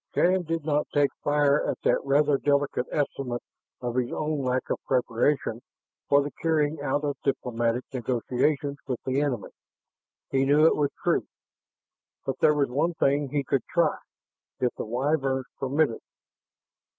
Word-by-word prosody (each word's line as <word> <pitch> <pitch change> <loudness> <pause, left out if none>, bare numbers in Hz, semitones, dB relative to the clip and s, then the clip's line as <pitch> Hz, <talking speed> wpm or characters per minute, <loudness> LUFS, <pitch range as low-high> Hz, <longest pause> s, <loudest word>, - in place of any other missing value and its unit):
Shann 185 +1 +3
did 165 -2 -3
not 150 -1 +1
take 145 -1 +3
fire 145 0 +3
at - - -1
that - - +2
rather 140 0 +3
delicate 140 -3 +1
estimate 135 -4 -2 0.4
of 120 0 -3
his 125 -1 0
own 155 -1 -1
lack 130 -1 -1
of - - 0
preparation 125 -1 +1 0.5
for 140 0 +5
the 145 - -5
carrying 155 -2 +1
out 145 +1 0
of 145 -2 -1
diplomatic 120 -3 0
negotiations 130 +3 0
with 125 -3 -2
the 130 +2 +1
enemy; 140 -5 -2 0.8
he 135 0 +2
knew 145 +3 +5
it - - +5
was 145 -2 +1
true. - - +1 1.0
But - - -3
there 150 - +5
was 140 -4 +1
one 165 +6 0
thing 140 -2 +1
he 145 +1 0
could 135 0 0
try 170 -3 +2 0.6
if 125 -1 +1
the - - -4
Wyverns 135 +2 0
permitted. 135 -2 +1
140 Hz, 150 wpm, -26 LUFS, 130-150 Hz, 1.0 s, for